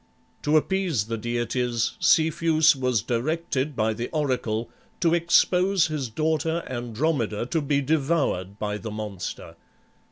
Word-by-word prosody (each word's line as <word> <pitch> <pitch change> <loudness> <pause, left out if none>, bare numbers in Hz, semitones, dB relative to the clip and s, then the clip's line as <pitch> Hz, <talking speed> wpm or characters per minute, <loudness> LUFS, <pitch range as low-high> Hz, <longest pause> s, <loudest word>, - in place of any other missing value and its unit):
To 150 +1 +3
appease 175 - 0
the 115 +1 -3
deities, 120 +1 -1
Cepheus 160 0 +4
was 125 -5 0
directed 135 +3 -1
by 110 0 +1
the 115 +3 -4
oracle 125 -7 -1 0.3
to 170 -2 +2
expose 180 +1 +3
his 145 -5 -3
daughter 160 +5 -1
Andromeda 120 -2 -2
to 140 +6 -1
be 140 0 +1
devoured 135 - 0
by 105 -1 -3
the 110 - -6
monster. 105 -4 -6
135 Hz, 125 wpm, -25 LUFS, 115-160 Hz, 0.3 s, Cepheus